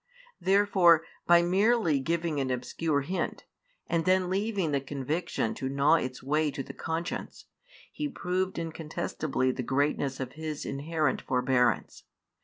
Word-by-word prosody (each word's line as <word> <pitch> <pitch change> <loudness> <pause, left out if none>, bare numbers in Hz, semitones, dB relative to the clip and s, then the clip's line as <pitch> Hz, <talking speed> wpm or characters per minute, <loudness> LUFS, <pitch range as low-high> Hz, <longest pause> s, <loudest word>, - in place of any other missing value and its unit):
Therefore, 190 -4 +4 0.2
by 170 0 +6
merely 190 - +3
giving 165 +1 -1
an 135 -1 -1
obscure 140 +4 -1
hint, 180 +5 -3 0.4
and 170 -1 0
then 185 +1 +2
leaving 195 -4 0
the 140 -1 +1
conviction 140 -1 -2
to 130 - -4
gnaw 140 +3 +3
its 130 -6 0
way 150 +3 +1
to 135 -1 -5
the - - -9
conscience, 165 +1 -4 0.5
He 300 - -3
proved 185 -3 -2
incontestably 155 -4 -2
the 130 - -4
greatness 140 +1 0
of 130 -1 -4
His 155 0 -5
inherent 150 +1 -1
forbearance. 125 -1 +1
155 Hz, 135 wpm, -29 LUFS, 135-175 Hz, 0.5 s, by